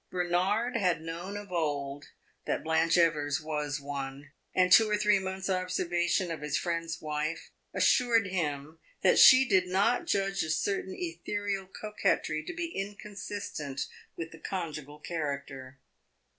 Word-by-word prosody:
Bernard 185 +7 0
had 180 -7 +1
known 170 +5 -5
of 205 -2 -9
old 145 -4 -2 0.4
that - - -1
Blanche 160 +1 +2
Evers 155 -3 +2
was 150 -2 -3
one, 140 0 -6 0.2
and 180 0 +3
two 220 +2 +8
or 210 - +2
three 210 -1 +3
months' 190 0 -4
observation 180 -1 0
of 160 -3 -5
his 150 -1 -1
friend's 165 -1 -2
wife 155 +2 -3 0.2
assured 235 -4 +3
him 155 -4 -3 0.2
that - - +5
she 260 +1 +9
did 190 -3 +3
not 200 +7 +2
judge 195 0 +1
a 160 - -2
certain 190 +3 -1
ethereal 195 +3 -3
coquetry 190 -6 -1
to - - -6
be 345 0 -2
inconsistent 200 -7 -5 0.4
with 165 -1 -5
the 165 - -12
conjugal 155 -6 -5
character. 140 -4 -5
175 Hz, 140 wpm, -30 LUFS, 150-195 Hz, 0.4 s, she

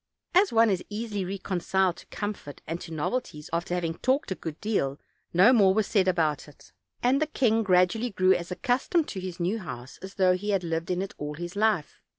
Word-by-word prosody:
As 380 +3 +5
one 225 -1 +5
is 185 - -1
easily 210 -2 -3
reconciled 190 -1 0
to - - -13
comfort 205 -9 -6
and 165 +2 -4
to 165 - -9
novelties, 155 -1 -3
after 170 +1 -1
having 170 -2 -1
talked 260 -3 +1
a - - 0
good 160 -3 -7
deal 150 -10 -1 0.3
no 190 +9 +6
more 195 -5 +5
was 215 -1 +2
said 195 -3 +2
about 160 -6 +1
it; 150 - -17 0.3
and 260 +4 +3
the 310 - +2
king 230 -7 +2
gradually 190 +4 +3
grew 185 -2 +3
as 175 -1 -3
accustomed 265 - 0
to 190 - -5
his 185 -1 -6
new 185 +6 0
house 130 - -8
as 190 +1 -9
though 185 -2 +4
he 205 +3 -4
had 195 -3 +1
lived 165 0 -2
in 180 +1 0
it 195 - -7
all 150 0 -4
his 175 +3 -6
life. 210 -7 0
190 Hz, 210 wpm, -27 LUFS, 170-220 Hz, 0.3 s, no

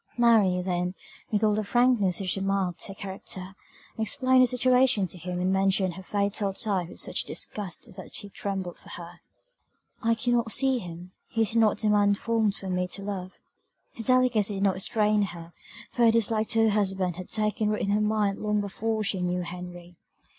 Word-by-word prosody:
Mary, 220 -6 +4
then, 180 0 -1 0.3
with 210 0 0
all 210 -1 +4
the 215 +1 0
frankness 235 -5 +2
which 190 -2 0
marked 195 -3 -1
her 195 - -7
character, 190 -1 -6 0.5
explained 255 +4 +3
her 255 - +6
situation 250 -3 +3
to 180 - -12
him 180 0 -5
and 185 +1 +1
mentioned 190 -1 +2
her 190 - -8
fatal 200 +1 -1
tie 195 -4 -1
with - - -5
such - - 0
disgust 195 -4 -4
that 190 -1 -10
he 205 - -5
trembled 190 -3 -5
for - - -16
her. 175 0 -9 0.8
"I 230 0 +2
cannot 235 0 0
see 265 0 +3
him; 175 -1 -9 0.2
he 225 - +1
is 220 - -1
not 225 -2 +4
the 215 - 0
man 205 -1 +4
formed 220 -1 0
for 195 - -4
me 180 0 -1
to 195 +2 -5
love!" 190 -2 -5 0.6
Her - - -6
delicacy 245 -5 +2
did 195 - -2
not 195 -1 +3
restrain 210 +2 +1
her, 170 -3 -5 0.4
for 240 -3 +2
her 225 - +6
dislike 220 -1 +1
to 225 +1 +2
her 220 - +4
husband 190 -4 0
had 185 - -8
taken 215 0 0
root 210 - -1
in 200 - 0
her 210 +1 +2
mind 210 -2 +1
long 210 0 0
before 215 +2 -2
she 195 -2 -1
knew 180 0 -1
Henry. 175 0 -8
200 Hz, 190 wpm, -27 LUFS, 185-220 Hz, 0.8 s, her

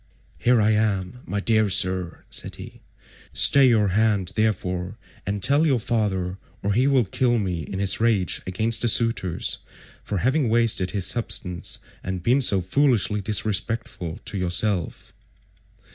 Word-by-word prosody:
"Here 125 -1 +3
I 110 +1 +3
am, 105 0 -1
my 100 +3 -2
dear 110 0 +1
sir," 90 -2 +1
said - - -6
he, - - -12 0.5
"stay 135 -2 +5
your 105 -4 +2
hand 100 -2 +1
therefore, 95 -3 -2 0.3
and 100 -1 -3
tell 140 +6 +4
your 135 -4 +2
father, 100 -5 -2 0.2
or 100 +1 0
he 125 +6 +2
will 135 -4 +3
kill 120 +5 0
me 90 -6 -2
in 95 - -7
his 100 0 +1
rage 110 -6 +1
against 110 +5 0
the 120 - +1
suitors 110 -6 +1 0.4
for 100 - -4
having 130 - +1
wasted 115 -5 +1
his 100 -3 -1
substance 90 -6 -2 0.3
and 95 -2 -5
been 125 +6 +2
so 100 -7 +3
foolishly 110 -2 +1
disrespectful 105 -4 -1
to 100 - -4
yourself." 90 -1 -1
105 Hz, 145 wpm, -23 LUFS, 95-115 Hz, 0.5 s, stay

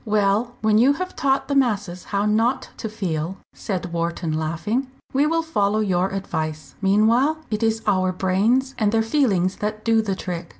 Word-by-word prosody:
"Well, 215 +2 +1
when 215 0 +4
you 265 +5 +5
have 370 +5 -5
taught 275 -3 +1
the 285 - -1
masses 205 -9 0
how 200 0 -1
not 225 +5 +1
to 220 - -4
feel," 180 -4 -3 0.2
said 180 -3 -4
Wharton, 170 -1 -2
laughing, 165 +12 -1 0.3
"we 280 +3 +3
will 330 +1 +1
follow 210 -10 +1
your 190 -3 +1
advice. 155 -7 -4
Meanwhile 225 +10 +3
it 215 +1 -1
is 225 0 0
our 185 -3 +2
brains 210 +9 +1
and 210 -2 +2
their 225 0 +2
feelings 215 -8 +1
that 215 +1 -4
do 225 -1 +4
the 200 -3 -2
trick. 175 -3 -5
210 Hz, 175 wpm, -22 LUFS, 185-235 Hz, 0.3 s, you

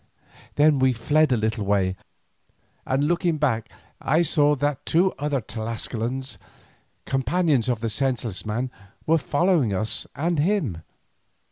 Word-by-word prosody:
Then 145 -1 +4
we 130 0 +3
fled 145 +5 +2
a 125 - +3
little 110 -1 -1
way, 95 -2 +1 0.9
and 135 +2 +1
looking 170 +1 +1
back 115 -6 0 0.3
I 160 +5 +2
saw 150 -2 +3
that 145 -1 -1
two 180 +3 +2
other 145 -2 -1
Tlascalans, 115 +3 -4 0.7
companions 135 -1 +1
of 120 -3 -1
the 115 - -1
senseless 120 -4 -1
man, 120 +4 -3 0.3
were 165 +1 +3
following 145 - +1
us 110 +4 -1
and 165 +3 0
him. 150 - 0
135 Hz, 130 wpm, -24 LUFS, 115-155 Hz, 0.9 s, Then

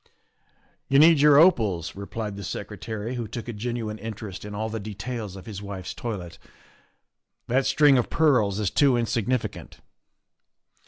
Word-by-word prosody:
' - - -45
' - - -40
" - - -41
You 135 - +4
need 160 +1 +7
your 145 0 +6
opals," 110 - +3
replied 105 +1 -5
the 100 - -7
Secretary, 110 +5 -5
who 120 -3 -4
took 115 +2 -7
a 120 - -4
genuine 110 -1 -4
interest 110 -3 -7
in 105 0 -7
all 110 +2 -2
the 110 0 -4
details 105 0 -6
of 95 - -10
his 100 -3 -7
wife's 100 -2 -6
toilet, 95 -8 -6 0.5
" - - -52
that 130 +2 +2
string 145 -4 +5
of 120 - -2
pearls 125 -11 +2
is 105 -3 0
too 135 -4 +4
insignificant." 120 +1 -2
110 Hz, 170 wpm, -25 LUFS, 100-125 Hz, 0.5 s, need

